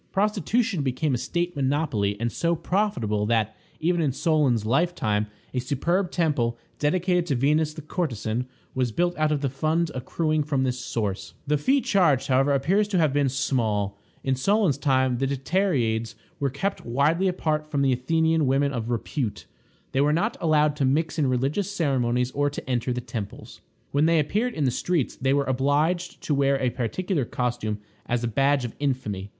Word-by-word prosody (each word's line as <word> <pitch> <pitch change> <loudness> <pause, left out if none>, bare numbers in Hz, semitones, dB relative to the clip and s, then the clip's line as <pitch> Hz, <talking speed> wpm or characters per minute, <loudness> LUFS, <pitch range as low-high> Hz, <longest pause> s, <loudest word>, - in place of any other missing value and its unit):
Prostitution 210 - +1
became 140 +2 0
a - - +2
state 175 +4 -2
monopoly, 130 -8 0
and 115 0 -1
so 170 +6 0
profitable 125 - 0
that, 110 -1 +1 0.2
even 175 +1 +1
in 150 -4 +2
Solon's 140 - +1
lifetime, 115 -6 +1 0.3
a 130 - 0
superb 170 +9 0
temple, 145 -10 0 0.2
dedicated 180 +3 +1
to 140 - +1
Venus 150 +4 +1
the 155 - -8
courtesan, 125 - -2 0.3
was 130 -2 0
built 175 +8 0
out 155 0 +1
of 145 -2 0
the 140 - +1
fund 155 +4 0
accruing 155 +5 -1
from 140 -3 0
this 125 -1 -1
source. 105 -6 -3
The 150 0 +1
fee 270 - +3
charged, 165 - +2
however, 135 +2 +3
appears 180 +10 +2
to 200 -3 0
have 155 -5 +3
been 145 -1 +2
small. 115 -7 0 0.3
In 135 - +1
Solon's 195 - +2
time, 130 -3 +2
the 135 - +1
Dicteriades 130 - 0 0.2
were 140 - +1
kept 195 +10 -3
widely 150 +10 +2
apart 155 -4 -1
from 140 -2 0
the 135 -1 +3
Athenian 160 +4 +1
women 140 +2 +2
of 115 -2 -3
repute. 120 0 -3 0.5
They 135 - +1
were 145 +1 +3
not 170 - 0
allowed 150 -2 +3
to 145 - 0
mix 155 +4 +1
in 145 - +3
religious 140 +11 0
ceremonies 125 -8 0
or 145 +1 +1
to 145 - -8
enter 125 -1 0
the 125 0 -2
temples. 115 -4 -7 0.3
When 145 +3 +3
they 165 0 +4
appeared 215 - 0
in 150 - -1
the 130 - +2
streets 160 +2 -1
they 135 +1 +1
were 140 - +2
obliged 145 +7 0
to 150 - 0
wear 140 -1 +2
a 130 -2 +1
particular 140 - -1
costume 120 -3 -2 0.3
as 120 0 0
a - - +1
badge 135 +3 +2
of 115 - -6
infamy. 115 -9 -2
140 Hz, 180 wpm, -25 LUFS, 125-165 Hz, 0.5 s, they